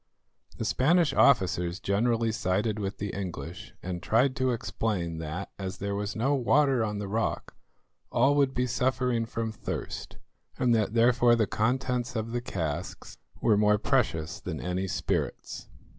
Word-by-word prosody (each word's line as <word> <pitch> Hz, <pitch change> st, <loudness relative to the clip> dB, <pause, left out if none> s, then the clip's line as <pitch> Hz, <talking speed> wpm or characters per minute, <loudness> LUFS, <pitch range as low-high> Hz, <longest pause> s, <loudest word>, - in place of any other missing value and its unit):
The -, -, -3 dB
Spanish 165 Hz, +4 st, +3 dB
officers 90 Hz, -8 st, +3 dB
generally 115 Hz, +3 st, +1 dB
sided 105 Hz, +2 st, 0 dB
with 100 Hz, -1 st, -3 dB
the 105 Hz, -, -3 dB
English, 90 Hz, 0 st, -6 dB
and 90 Hz, -1 st, -4 dB
tried 125 Hz, +7 st, +2 dB
to 130 Hz, 0 st, +1 dB
explain 100 Hz, -8 st, -2 dB
that, 80 Hz, +5 st, -5 dB
as 95 Hz, -1 st, -4 dB
there 100 Hz, 0 st, -3 dB
was 105 Hz, +1 st, -3 dB
no 130 Hz, +6 st, +1 dB
water 135 Hz, -1 st, +3 dB
on 105 Hz, -1 st, -2 dB
the 100 Hz, -1 st, -4 dB
rock, 110 Hz, +3 st, -2 dB, 0.6 s
all 130 Hz, +4 st, +4 dB
would 140 Hz, -2 st, +2 dB
be 125 Hz, -, +1 dB
suffering 125 Hz, -1 st, 0 dB
from 115 Hz, -1 st, -3 dB
thirst, 110 Hz, -, -6 dB, 0.4 s
and 125 Hz, -2 st, +3 dB
that 110 Hz, -1 st, +1 dB
therefore 120 Hz, 0 st, +5 dB
the 115 Hz, -2 st, +2 dB
contents 125 Hz, +3 st, -1 dB
of 110 Hz, 0 st, -2 dB
the 120 Hz, 0 st, -1 dB
casks 80 Hz, -10 st, -5 dB, 0.2 s
were 105 Hz, -3 st, +4 dB
more 105 Hz, 0 st, +4 dB
precious 100 Hz, -, 0 dB
than 85 Hz, -4 st, -5 dB
any 90 Hz, +1 st, -2 dB
spirits. -, -, -3 dB
110 Hz, 155 wpm, -28 LUFS, 95-125 Hz, 0.6 s, therefore